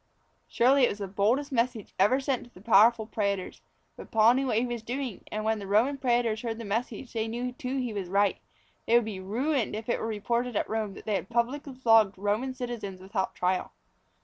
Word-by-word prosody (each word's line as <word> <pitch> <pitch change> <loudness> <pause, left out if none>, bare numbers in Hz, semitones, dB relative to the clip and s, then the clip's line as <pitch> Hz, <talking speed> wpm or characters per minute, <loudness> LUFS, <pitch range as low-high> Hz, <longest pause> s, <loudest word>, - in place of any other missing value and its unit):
Surely 265 +4 +3
it 245 - +5
was - - -4
the 200 -2 -4
boldest 225 +10 +1
message 235 -3 -1
ever 210 +8 +4
sent 270 -2 -1
to - - -17
the - - -16
powerful 220 +2 +5
prætors. 200 -3 -2 0.3
But - - -11
Paul 220 +1 +5
knew 265 +1 0
what 220 - +1
he 235 - +2
was 240 -2 -4
doing, 245 -1 -5
and 215 0 -3
when 220 0 +1
the 200 - -7
Roman 240 +8 +2
prætors 240 -4 +1
heard 230 -2 -3
the 230 - -7
message 230 +4 -3
they 225 -1 -1
knew 240 +2 -3
that 245 - -18
he 250 -2 -2
was 195 -4 -4
right. 200 +1 +2 0.5
They 230 - +4
would 240 -2 +4
be 210 -3 -5
ruined 235 +5 -1
if 220 +1 -6
it - - +1
were - - -3
reported 235 +3 -1
at - - 0
Rome 215 -3 -3
that - - -11
they 215 - -1
had 195 - -2
publicly 255 +4 -1
flogged 225 -6 +4
Roman 210 +7 -1
citizens 235 -7 -5
without 190 +1 -3
trial. 180 0 -1
225 Hz, 220 wpm, -28 LUFS, 205-245 Hz, 0.5 s, it